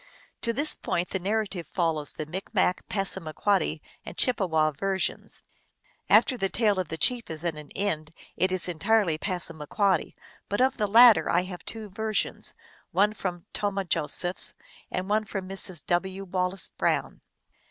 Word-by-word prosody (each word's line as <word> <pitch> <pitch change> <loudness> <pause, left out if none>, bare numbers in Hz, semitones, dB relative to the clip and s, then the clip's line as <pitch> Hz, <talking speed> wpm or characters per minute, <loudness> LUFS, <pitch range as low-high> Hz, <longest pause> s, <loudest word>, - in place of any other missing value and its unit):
To 235 - +1
this 290 +6 +3
point 175 +1 -2
the 190 - -2
narrative 200 -2 -2
follows 160 -4 0
the 155 - -5
Micmac, 185 +2 -1
Passamaquoddy, 190 -3 0 0.2
and - - -9
Chippewa 165 -11 +2
versions. 190 +6 -1 0.7
After 255 - +5
the 195 -1 0
tale 205 0 +2
of 185 - -1
the 160 - -5
chief 240 +8 +1
is 160 +1 -4
at 170 -2 0
an 150 -1 -9
end 160 -6 -1 0.3
it 185 0 +1
is 185 -1 +1
entirely 175 -1 +2
Passamaquoddy; 175 +1 -1 0.3
but 205 - -1
of 265 +1 +3
the 210 -3 +1
latter 225 -5 +7
I 175 +1 +3
have 180 -1 -8
two 220 -2 -5
versions, 215 +2 -2 0.3
one 205 +3 +3
from 180 -4 -4
Tomah 200 -1 -1
Josephs 170 +2 +1 0.3
and 185 +1 -3
one 215 +2 +2
from 195 -3 -5
Mrs. 190 -3 -1
"VV. 190 +2 0
Wallace 185 0 -1
Brown. - - -1
190 Hz, 155 wpm, -27 LUFS, 170-205 Hz, 0.7 s, latter